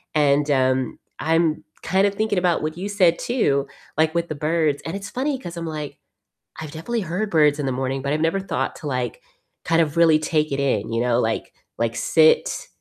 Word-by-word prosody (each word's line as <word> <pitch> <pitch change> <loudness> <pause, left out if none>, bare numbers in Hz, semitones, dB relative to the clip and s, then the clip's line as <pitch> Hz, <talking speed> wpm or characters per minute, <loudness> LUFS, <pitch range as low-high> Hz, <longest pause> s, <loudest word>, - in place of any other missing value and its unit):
and, 145 0 +3
um, 130 -1 +1 0.2
I'm 160 -1 +1 0.2
kinda 195 +3 +2
thinking 215 -1 -1
about 175 -2 +1
what 155 +2 -3
you 200 +3 -4
said 185 -4 +3
too, 145 - +1 0.3
like, 160 +1 +2
with 170 0 0
the 155 - -4
birds 155 -1 0
and 165 +4 -4
it's 200 - -8
funny 265 +1 -2
'cause 175 -7 -8
I'm 170 0 -5
like, 150 -3 -5 0.6
I've 155 -2 -7
definitely 225 +9 -3
heard 185 +5 -2
birds 150 -2 +4
in 145 - -2
the 130 - 0
morning, 130 +1 -2
but 140 +1 -1
I've 155 - 0
never 165 +4 +1
thought 195 - -3
to, 150 - -9
like, 125 -3 -3 0.4
kind 165 0 +2
of 155 0 0
really 165 -2 +5
take 155 -2 0
it 140 - -1
in, 115 -5 0
you 115 - 0
know, 120 0 +2
like 110 0 -2 0.3
like 115 0 -1
sit, 160 -1 +3
155 Hz, 205 wpm, -22 LUFS, 140-170 Hz, 0.6 s, really